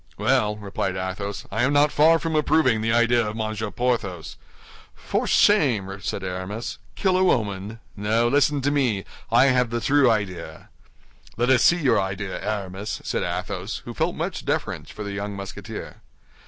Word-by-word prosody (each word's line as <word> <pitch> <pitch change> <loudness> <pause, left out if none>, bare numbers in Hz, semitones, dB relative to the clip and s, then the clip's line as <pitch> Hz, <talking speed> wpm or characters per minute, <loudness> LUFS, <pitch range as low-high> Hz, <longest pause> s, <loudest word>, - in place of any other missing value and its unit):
"Well," 105 0 +2
replied 95 -2 -3
Athos, 95 +2 -4
"I 110 +3 -1
am 135 +4 +2
not 145 +1 +4
far 160 +2 +5
from 165 -1 -3
approving 150 -7 +3
the 115 +1 0
idea 120 0 +3
of 105 - -4
Monsieur 110 -1 -3
Porthos." 105 -9 -2 0.6
"For - - -2
shame!" 110 - +3
said 100 - -3
Aramis. 95 +5 -5 0.2
"Kill 190 -2 +1
a 185 - +3
woman? 105 - 0 0.2
No, 110 +3 +1
listen 145 +2 +2
to 140 +2 +1
me; 125 -10 0 0.3
I 130 - +6
have 125 -2 +2
the 120 +1 -2
true 140 +1 +4
idea." 90 -8 -3 0.7
"Let 120 +3 +2
us 130 - +5
see 175 - +5
your 140 - +2
idea, 95 0 -4
Aramis," 100 -1 -4
said - - -2
Athos, - - -4
who - - -6
felt - - -1
much - - -4
deference - - -2
for 105 - -7
the 100 -1 -5
young 100 0 -4
Musketeer. 100 0 -7
110 Hz, 170 wpm, -24 LUFS, 100-130 Hz, 0.7 s, I